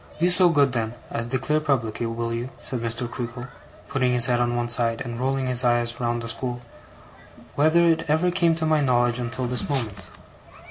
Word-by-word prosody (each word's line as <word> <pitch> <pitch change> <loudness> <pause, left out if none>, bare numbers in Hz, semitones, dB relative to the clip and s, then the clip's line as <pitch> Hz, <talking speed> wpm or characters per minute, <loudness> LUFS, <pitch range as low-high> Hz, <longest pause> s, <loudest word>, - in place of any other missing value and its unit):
'Be 175 +2 +3
so 180 0 +5
good 145 -5 +3
then 115 -1 -2 0.2
as 115 0 -3
declare 135 +5 0
publicly, 120 -7 -1
will 115 0 -3
you,' 120 +2 -4
said 125 - -3
Mr. 115 +1 -2
Creakle, 120 0 -6 0.4
putting 130 -2 0
his 120 -1 +5
head 120 -1 +2
on 120 0 0
one 120 0 -1
side, 115 -1 +2
and 120 -1 -5
rolling 135 +1 -1
his 125 0 +3
eyes 120 -1 +1
round 120 -1 -2
the - - -5
school, 120 +1 -4 0.9
'whether 160 +4 +3
it 165 0 +1
ever 160 +4 +2
came 170 -2 +2
to 160 0 -2
my 155 -1 +2
knowledge 120 -2 +1
until 125 +1 -3
this 125 -2 -1
moment? 110 -8 -2
125 Hz, 195 wpm, -24 LUFS, 120-140 Hz, 0.9 s, so